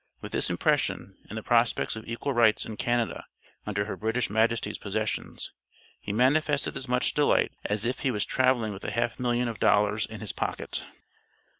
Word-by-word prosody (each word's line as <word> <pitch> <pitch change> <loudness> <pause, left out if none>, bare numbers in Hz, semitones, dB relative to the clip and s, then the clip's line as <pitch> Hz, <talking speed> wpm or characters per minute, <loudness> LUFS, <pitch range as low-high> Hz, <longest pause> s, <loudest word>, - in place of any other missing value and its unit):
With - - -8
this - - 0
impression, 95 - 0 0.2
and 110 - -6
the 110 - -5
prospects 120 -1 +2
of 110 - -8
equal 115 +4 -2
rights 115 -3 +4
and 110 - -6
Canada, 120 +1 -1 0.4
under 100 -1 0
her 105 - -4
British 110 +1 -1
Majesty's 115 +1 +1
possessions, - - -3 0.5
he 105 - -5
manifested 140 +6 +2
as 130 - -5
much 125 +1 +2
delight 145 -1 +3
as 105 +1 0
if 125 +2 -1
he 135 - 0
was 105 -5 0
traveling 130 -4 +2
with 95 - -9
a - - -2
half 115 +3 -1
million 120 -1 +1
of 115 -4 -5
dollars 105 +1 +3
in - - -8
his - - -2
pocket. - - -3
115 Hz, 180 wpm, -28 LUFS, 105-125 Hz, 0.5 s, rights